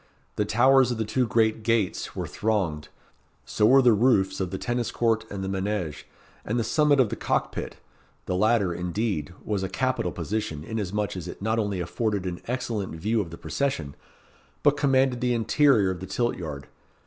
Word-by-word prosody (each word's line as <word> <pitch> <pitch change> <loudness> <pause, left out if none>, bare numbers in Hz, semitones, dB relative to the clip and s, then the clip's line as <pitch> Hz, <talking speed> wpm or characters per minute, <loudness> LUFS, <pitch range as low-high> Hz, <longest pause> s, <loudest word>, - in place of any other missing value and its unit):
The 105 - 0
towers 130 +4 +4
of 120 - -2
the 110 - -1
two 125 +3 0
great 110 0 +2
gates 110 -4 0
were - - -3
thronged 95 -9 -1 0.6
so 105 - +2
were 135 +3 +6
the 120 -2 +6
roofs 100 -4 +2
of 95 -2 -1
the 95 - -4
tennis 120 +1 -2
court 115 -2 +1
and 100 -1 -5
the - - -3
manége, 95 -4 -3 0.4
and 115 - -2
the 120 - +1
summit 145 +4 +3
of 125 -5 +4
the - - -3
cock - - -1
pit; - - -5 0.5
the 90 - -1
latter, 105 -2 +2
indeed, 90 -2 -2
was 105 -3 -1
a 95 - -2
capital 130 -4 -1
position 85 -3 -3
inasmuch 105 0 -3
as 90 -2 -6
it - - -8
not 110 +3 0
only 100 -3 -1
afforded 100 +3 -2
an 90 -1 -4
excellent 115 -7 -3
view 110 +7 0
of 90 - -6
the 85 - -9
procession, 80 - -2 0.7
but 145 - +5
commanded 135 -3 +2
the 125 -1 +1
interior 115 -3 +3
of 90 - -5
the 95 - -7
tilt 120 -1 0
yard. 75 -6 -6
105 Hz, 190 wpm, -26 LUFS, 95-120 Hz, 0.7 s, were